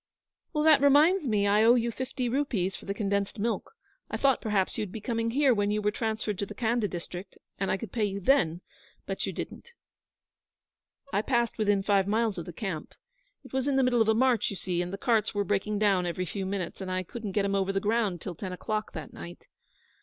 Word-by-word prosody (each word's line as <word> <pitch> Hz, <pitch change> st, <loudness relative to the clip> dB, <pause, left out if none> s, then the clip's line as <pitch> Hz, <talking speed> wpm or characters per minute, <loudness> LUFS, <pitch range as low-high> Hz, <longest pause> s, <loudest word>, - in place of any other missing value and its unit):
'That 300 Hz, -1 st, +5 dB
reminds 295 Hz, +4 st, +5 dB
me 210 Hz, -3 st, +2 dB
I 205 Hz, +2 st, +4 dB
owe 235 Hz, +2 st, +7 dB
you 235 Hz, -1 st, +1 dB
fifty 260 Hz, +1 st, -3 dB
rupees 235 Hz, -8 st, 0 dB
for -, -, -10 dB
the 200 Hz, -, -2 dB
condensed 200 Hz, 0 st, -1 dB
milk. 220 Hz, -, -2 dB, 0.4 s
I -, -, -2 dB
thought 270 Hz, -3 st, +3 dB
perhaps 205 Hz, -4 st, 0 dB
you'd 210 Hz, -4 st, -3 dB
be 220 Hz, -, -6 dB
coming 230 Hz, +1 st, -1 dB
here 270 Hz, +2 st, +4 dB
when 205 Hz, -2 st, +1 dB
you 210 Hz, +1 st, +1 dB
were 210 Hz, 0 st, +1 dB
transferred 220 Hz, -2 st, -2 dB
to 200 Hz, -, -2 dB
the -, -, -9 dB
Khanda 230 Hz, -2 st, +1 dB
district, 180 Hz, +1 st, -7 dB, 0.2 s
and 195 Hz, -, 0 dB
I -, -, +1 dB
could 230 Hz, -, -7 dB
pay 225 Hz, -3 st, +1 dB
you 200 Hz, -1 st, -3 dB
then; 180 Hz, -, +2 dB, 0.4 s
but -, -, -3 dB
you -, -, -2 dB
didn't.' 480 Hz, -, -7 dB, 1.4 s
'I 200 Hz, -, +3 dB
passed 235 Hz, -1 st, 0 dB
within 205 Hz, -2 st, +2 dB
five 195 Hz, -1 st, +2 dB
miles 215 Hz, -2 st, +1 dB
of 165 Hz, -, -6 dB
the -, -, -7 dB
camp. 175 Hz, -4 st, -5 dB, 0.5 s
It -, -, -15 dB
was 265 Hz, +1 st, 0 dB
in 280 Hz, -, +2 dB
the 270 Hz, -, +4 dB
middle 245 Hz, -2 st, +3 dB
of 220 Hz, -, +3 dB
a 220 Hz, -, +4 dB
march, 250 Hz, -2 st, +3 dB
you 200 Hz, -, -5 dB
see, 175 Hz, -1 st, -2 dB
and 175 Hz, 0 st, -4 dB
the 195 Hz, -, -4 dB
carts 225 Hz, -2 st, +1 dB
were 205 Hz, -, +2 dB
breaking 205 Hz, +2 st, 0 dB
down 195 Hz, -4 st, +2 dB
every 185 Hz, +1 st, -2 dB
few 190 Hz, +2 st, -4 dB
minutes, 195 Hz, -1 st, -4 dB
and 190 Hz, -, -4 dB
I 185 Hz, 0 st, -1 dB
couldn't 210 Hz, +1 st, -6 dB
get 205 Hz, 0 st, +1 dB
'em 200 Hz, -, 0 dB
over 195 Hz, 0 st, +1 dB
the 195 Hz, -, 0 dB
ground 205 Hz, -4 st, 0 dB
till 185 Hz, -, -5 dB
ten 185 Hz, +3 st, -6 dB
o'clock 215 Hz, +4 st, -3 dB
that 155 Hz, -5 st, -7 dB
night. 85 Hz, +1 st, -10 dB
210 Hz, 230 wpm, -28 LUFS, 195-235 Hz, 1.4 s, owe